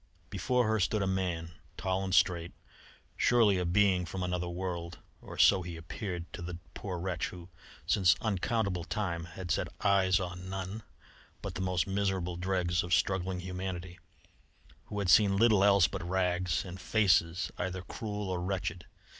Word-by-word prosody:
Before 125 +4 +1
her 110 0 +2
stood 100 +2 +1
a - - +1
man, 90 -3 -1 0.3
tall 95 -1 -1
and 95 - -3
straight, 85 -2 +2 0.6
surely 110 -6 +4
a 90 - -1
being 95 0 +3
from 90 +2 -4
another 90 -1 -2
world 85 -1 -4 0.2
or - - -10
so 95 -2 +6
he 85 -1 -6
appeared 85 +1 -5
to - - -6
the 85 0 -5 0.2
poor 95 -3 -5
wretch 85 -1 -2
who, 90 0 -10 0.4
since 95 -4 +4
uncountable 100 -3 -1
time, 85 -3 -2
had 90 0 -6
set - - +1
eyes 100 -1 +4
on 90 0 -5
none 95 +3 -4 0.6
but - - -4
the - - -4
most 90 -2 +1
miserable 95 -3 -1
dregs 90 -1 0
of 90 0 +2
struggling 95 -1 0
humanity, 90 -1 -5 0.9
who 105 - -7
had 100 -2 -1
seen 100 +2 +6
little 110 -2 +5
else 100 -4 +6
but - - -5
rags, 90 0 0
and 90 0 -8
faces 90 -5 +2
either 90 0 -3
cruel 105 +2 -5
or 90 -1 -2
wretched. 90 -2 -3
90 Hz, 165 wpm, -31 LUFS, 90-100 Hz, 0.9 s, so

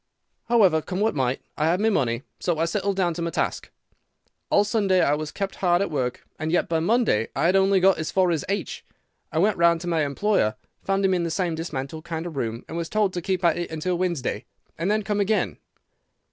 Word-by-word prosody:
However, 195 -9 +4
come 185 +4 -4
what 220 +2 +2
might, 130 -2 -1 0.2
I 155 - +2
had 175 +3 +2
my 220 +1 +2
money, 125 - 0 0.2
so 175 -3 0
I 165 - +1
settled 200 +3 -1
down 180 -3 +1
to 170 - -5
my 170 - -1
task. - - -2 0.8
All 205 - +4
Sunday 205 -3 +2
I 145 - +3
was 150 0 -2
kept 195 -1 -4
hard 175 -2 +2
at 200 -3 -1
work, 125 -4 -2
and 155 +1 -2
yet 175 - +2
by 165 -1 +1
Monday 200 - +2
I - - +1
had 180 +3 +3
only 195 0 +4
got 190 0 +4
as 160 - -2
far 185 -2 +3
as 160 -4 -1
H. 200 -4 -3 0.5
I 155 - -3
went 200 +5 +3
round 170 0 +4
to 175 - -6
my 165 -3 +1
employer, 140 - +1 0.3
found 195 0 0
him 190 - +3
in 180 - +1
the 170 - -1
same 175 0 -1
dismantled 155 -2 -5
kind 165 -1 -4
of 170 -3 -6
room, 115 -3 -3
and 165 - -6
was 170 -1 -3
told 210 -3 +1
to 175 - -3
keep 185 0 -1
at 170 0 +3
it 175 - -3
until 160 +3 -2
Wednesday, 170 - -2 0.3
and 170 +4 -2
then 215 0 +1
come 205 +1 -1
again. 205 +2 0
175 Hz, 230 wpm, -24 LUFS, 160-195 Hz, 0.8 s, However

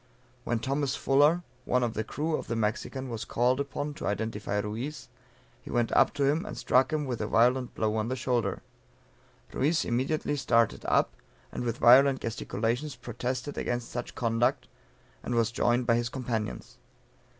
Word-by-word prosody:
When 120 - 0
Thomas 135 +3 -1
Fuller, 145 +7 +3 0.2
one 125 0 +1
of 115 -2 -1
the 110 - -2
crew 155 +8 -2
of - - -5
the 115 - -2
Mexican 115 +4 -2
was 115 -2 -4
called 125 +3 +1
upon 140 +1 -3
to - - -5
identify 105 -1 -2
Ruiz, 110 +9 -4 0.5
he - - -12
went 120 -1 0
up - - +4
to 140 - 0
him 150 +5 +2
and 210 - -7
struck 130 +1 +3
him 150 -2 -1
a 125 - -1
violent 125 +3 +2
blow 110 0 0
on 110 0 -1
the 130 - -1
shoulder. 125 -1 -1 0.9
Ruiz 155 +5 +1
immediately 135 +5 0
started 115 -4 +2
up, - - +2 0.4
and - - -4
with 120 -1 -2
violent 135 +3 +6
gesticulations 120 +4 -2
protested 125 +3 -4
against 120 -1 -3
such 120 0 -5
conduct, 115 0 +1 0.5
and 120 - -3
was 115 -1 +2
joined 120 +1 +1
by 115 - +3
his 120 0 -1
companions. 120 -5 -4
125 Hz, 165 wpm, -28 LUFS, 115-135 Hz, 0.9 s, violent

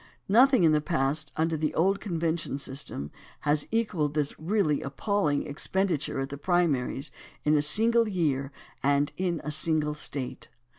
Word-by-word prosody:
Nothing 250 +2 +5
in 160 - +5
the 150 -1 +3
past 150 -1 -1
imder 160 0 0
the 155 0 -1
old 195 +4 +2
convention 165 -6 -2
system 135 - -5 0.3
has 145 0 +1
equalled 185 -10 -1
this 150 -2 0
really 160 -3 +1
appalling 150 +1 -1
expenditure 165 0 -1
at 135 0 -3
the 140 0 -7
primaries 150 -5 0 0.3
in 150 +1 +4
a 150 - +3
single 225 +8 +4
year 145 -8 -1 0.3
and 145 +1 +2
in 180 -3 -2
a 150 - -3
single 155 0 +1
State. 140 -3 -5
155 Hz, 150 wpm, -27 LUFS, 145-180 Hz, 0.3 s, Nothing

